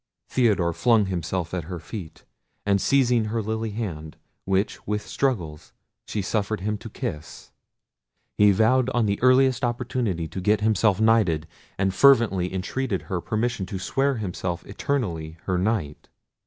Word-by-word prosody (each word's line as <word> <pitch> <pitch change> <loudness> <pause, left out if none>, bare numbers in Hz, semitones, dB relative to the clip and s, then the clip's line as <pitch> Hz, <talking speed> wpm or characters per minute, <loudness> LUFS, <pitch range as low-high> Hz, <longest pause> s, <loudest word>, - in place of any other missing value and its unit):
Theodore 100 -9 +2
flung 115 +1 +3
himself 90 -1 -3
at 90 -4 -3
her 90 +1 -5
feet, 80 -3 -9 0.4
and 100 -1 +2
seizing 125 -4 +3
her 110 +2 -2
lily 110 +1 -2
hand, 85 -8 -5 0.3
which 95 +2 -1
with 105 0 -2
struggles 85 - -2 0.3
she 105 - -2
suffered 105 +1 -1
him 105 +2 -1
to - - -9
kiss, 75 +1 -6 0.8
he 105 0 +5
vowed 115 +6 +3
on 120 -2 +3
the 100 -1 -1
earliest 130 0 +4
opportunity 120 -8 -1
to 90 +4 -6
get 105 +3 +2
himself 105 -2 +2
knighted, 110 -9 +3 0.3
and 95 -1 +1
fervently 115 -8 +4
entreated 95 +3 -2
her 95 -4 -3
permission 110 -2 -2
to 100 - -4
swear 135 +8 0
himself 90 -5 -4
eternally 90 - -3
her 90 -2 0
knight. 90 -7 -2
105 Hz, 145 wpm, -24 LUFS, 90-115 Hz, 0.8 s, he